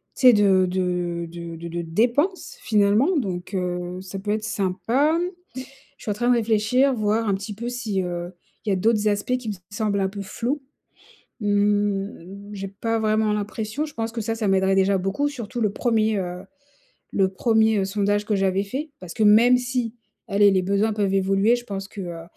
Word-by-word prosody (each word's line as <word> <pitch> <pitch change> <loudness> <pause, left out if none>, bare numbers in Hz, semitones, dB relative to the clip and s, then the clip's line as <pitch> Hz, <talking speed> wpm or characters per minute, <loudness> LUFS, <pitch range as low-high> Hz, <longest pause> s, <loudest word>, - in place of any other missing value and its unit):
tu 255 - +4
sais 250 - +9
de 195 -3 +4
de 180 -2 -2
de 170 0 -7
de 170 +1 -7
de 170 +1 -3
dépenses 240 - 0
finalement 215 - +3
donc, 185 -7 -3
heu, 180 -1 -3
ça 190 +1 -7
peut 205 +2 -3
être 215 0 -1
sympa. 225 - +1 0.8
Je - - -18
suis - - -2
en - - 0
train 240 +4 -1
de 245 - +5
réfléchir, 230 +4 +2
voir 215 0 0
un 200 - +2
petit 200 +2 -5
peu 235 +4 -5
si, 225 -6 -2
heu, 175 0 -4 0.3
il 215 - -1
y - - +3
a - - +2
d'autres 215 +2 +2
aspects 205 +5 0
qui 245 -3 -8
me - - -3 0.2
semblent 205 -1 -1
un 190 - +1
peu 200 +1 -6
flous. 245 +8 -3 0.8
Mmh, 205 -1 -1
j'ai 195 -1 -5
pas 225 +4 -2
vraiment 215 -1 +1
l'impression. 215 +6 -3
Je 300 - -9
pense 225 0 -3
que 230 - -4
ça, 225 +1 -2
ça 225 -2 -1
m'aiderait 190 0 +3
déjà 195 0 +3
beaucoup 195 +10 0
surtout 245 -4 -6
le 210 -3 +1
1er, 220 -2 +1
heu, 180 -1 -4 0.7
le 195 -1 +3
1er 220 +1 +2
sondage 205 +1 0
que 210 -1 0
j'avais 195 0 +1
fait. 275 +10 -5
Parce 180 -2 -9
que - - -1
même 230 +4 +6
si, 250 -2 -2 0.3
allez, 200 0 +5
les 190 -1 +2
besoins 200 +4 +1
peuvent 200 -2 0
évoluer, 195 +4 +3
je 240 - -8
pense 195 -3 -5
que, 205 - -9
heu, 170 -2 -6
205 Hz, 200 wpm, -23 LUFS, 190-225 Hz, 0.8 s, sais